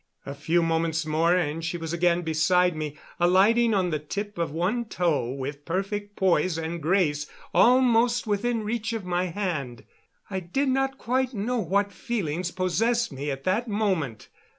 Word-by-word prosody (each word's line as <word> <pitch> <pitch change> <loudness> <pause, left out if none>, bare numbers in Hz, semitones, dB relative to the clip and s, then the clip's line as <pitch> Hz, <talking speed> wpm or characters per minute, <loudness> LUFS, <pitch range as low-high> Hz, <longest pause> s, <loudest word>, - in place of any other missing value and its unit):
A 140 - -5
few 165 +4 +1
moments 165 -1 0
more, 160 +3 +2
and 165 -2 -1
she 170 +1 -2
was 165 -1 -5
again 175 0 +2
beside 170 +2 +2
me, 155 -1 -5 0.2
alighting 205 +6 +4
on 185 -3 +1
the 155 - -1
tip 200 +6 -5
of 170 - 0
one 185 +10 -1
toe 165 - 0
with 140 +2 -5
perfect 205 +4 -3
poise 180 -2 +2
and 165 +1 -4
grace 155 -3 +1 0.3
almost 245 -1 +4
within 220 +2 0
reach 220 +1 -2
of 220 -4 -4
my 180 0 0
hand. 165 -10 -3 0.4
I 190 -2 -3
do 185 +11 -1
not 270 0 0
quite 255 +1 -1
know 235 +4 -1
what 200 +1 0
feelings 180 -6 -2
possessed 225 +7 0
me 140 +2 -4
at 135 -1 -4
that 215 +6 0
moment. 190 - -1
180 Hz, 165 wpm, -26 LUFS, 160-215 Hz, 0.4 s, alighting